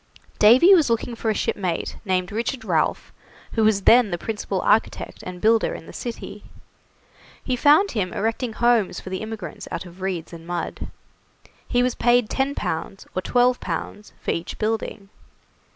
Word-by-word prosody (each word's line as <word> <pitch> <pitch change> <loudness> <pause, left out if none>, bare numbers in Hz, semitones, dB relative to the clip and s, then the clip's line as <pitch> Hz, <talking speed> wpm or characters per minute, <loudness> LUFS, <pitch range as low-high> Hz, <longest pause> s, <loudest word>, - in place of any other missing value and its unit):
Davy 250 - +7
was 320 -9 +4
looking 230 +1 -1
for 230 -1 -2
a 215 - +1
shipmate 180 -5 -2
named 185 -2 0
Richard 235 +4 -3
Ralph, - - 0 0.4
who 225 - +1
was 210 -2 +3
then 240 -2 +6
the 175 - -2
principal 205 -1 -3
architect 225 - 0
and 180 -1 -8
builder 225 +3 +2
in - - -10
the - - -12
city. 230 -3 -7 1.0
He 255 - -1
found 300 +10 +5
him 190 -6 -2
erecting 225 +2 -2
homes 235 -3 +2
for 185 - -9
the 185 - -3
immigrants 215 -7 -7
out - - -5
of 180 +1 -13
reeds 180 -3 -3
and 165 0 -10
mud. 175 -1 -4 0.8
He 245 -1 +2
was 250 -1 +1
paid 240 -2 +2
10 275 +1 0
pounds 165 +4 -4
or 185 - 0
12 245 +4 +2
pounds 210 0 -5
for - - -2
each 165 - -4
building. 215 -2 -3
220 Hz, 170 wpm, -23 LUFS, 185-245 Hz, 1.0 s, Davy